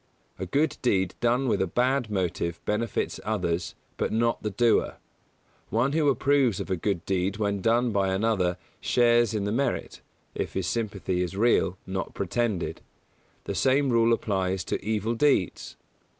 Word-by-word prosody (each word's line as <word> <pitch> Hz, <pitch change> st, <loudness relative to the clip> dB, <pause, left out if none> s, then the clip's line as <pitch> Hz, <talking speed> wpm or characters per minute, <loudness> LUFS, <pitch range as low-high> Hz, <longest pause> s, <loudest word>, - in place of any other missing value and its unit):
A 95 Hz, -, -4 dB
good 145 Hz, -, +1 dB
deed 95 Hz, -7 st, +1 dB
done 125 Hz, +3 st, +1 dB
with 115 Hz, -, +1 dB
a 95 Hz, -, +1 dB
bad 125 Hz, +4 st, +1 dB
motive 85 Hz, -4 st, -2 dB
benefits 110 Hz, +2 st, -1 dB
others, 90 Hz, -5 st, -2 dB, 0.2 s
but -, -, -1 dB
not 115 Hz, +1 st, +1 dB
the 105 Hz, -, -2 dB
doer. 115 Hz, +3 st, +2 dB, 0.7 s
One 120 Hz, +5 st, +1 dB
who 150 Hz, -1 st, +2 dB
approves 135 Hz, -5 st, +2 dB
of -, -, -5 dB
a -, -, +2 dB
good 90 Hz, 0 st, -2 dB
deed 95 Hz, +1 st, 0 dB
when 100 Hz, -2 st, -1 dB
done 120 Hz, +3 st, +2 dB
by 100 Hz, -2 st, +1 dB
another 95 Hz, -3 st, +1 dB, 0.2 s
shares 120 Hz, -2 st, +3 dB
in 105 Hz, -, -1 dB
the 100 Hz, -, -1 dB
merit, 130 Hz, +2 st, -2 dB, 0.3 s
if -, -, -4 dB
his 95 Hz, -, -2 dB
sympathy 100 Hz, -3 st, -2 dB
is 90 Hz, +2 st, -3 dB
real, 105 Hz, -4 st, +2 dB
not 95 Hz, 0 st, -4 dB
pretended. 95 Hz, -5 st, -2 dB, 0.6 s
The -, -, -4 dB
same 130 Hz, +7 st, +2 dB
rule 115 Hz, 0 st, +4 dB
applies 95 Hz, -4 st, 0 dB
to -, -, -3 dB
evil 110 Hz, +1 st, -1 dB
deeds. 120 Hz, -, +1 dB
105 Hz, 160 wpm, -26 LUFS, 95-120 Hz, 0.7 s, rule